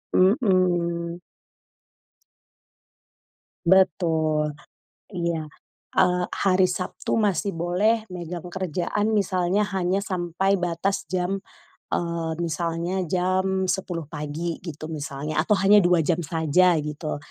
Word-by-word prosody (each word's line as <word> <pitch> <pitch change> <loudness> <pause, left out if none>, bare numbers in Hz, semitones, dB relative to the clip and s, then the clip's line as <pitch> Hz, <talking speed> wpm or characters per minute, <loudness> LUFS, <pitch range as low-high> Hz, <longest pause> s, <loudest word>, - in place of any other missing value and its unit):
mhm. 180 - +2 2.5
Betul, 160 -5 +2 0.5
iya. 170 -5 -2 0.5
Eee, 180 -1 +4
hari 185 -1 +3
Sabtu 180 +4 -2
masih 200 -2 +1
boleh 195 +7 +1
megang 175 -1 -6
kerjaan 190 +4 -1
misalnya 190 +1 +1
hanya 185 +1 +1
sampai 185 +1 0
batas 180 +3 -1
jam, 185 +1 -1 0.5
eee, 170 -1 -2
misalnya 170 +2 -2
jam 185 +1 +1
10:00 180 -3 -2
pagi, 155 +2 -4
gitu 155 -3 -7
misalnya. 150 +1 -2
Atau 210 +5 +2
hanya 200 +2 +6
2 175 -1 +4
jam 175 +1 +1
saja, 165 +2 +3
gitu. 150 +1 -4
175 Hz, 95 wpm, -24 LUFS, 165-190 Hz, 2.5 s, hanya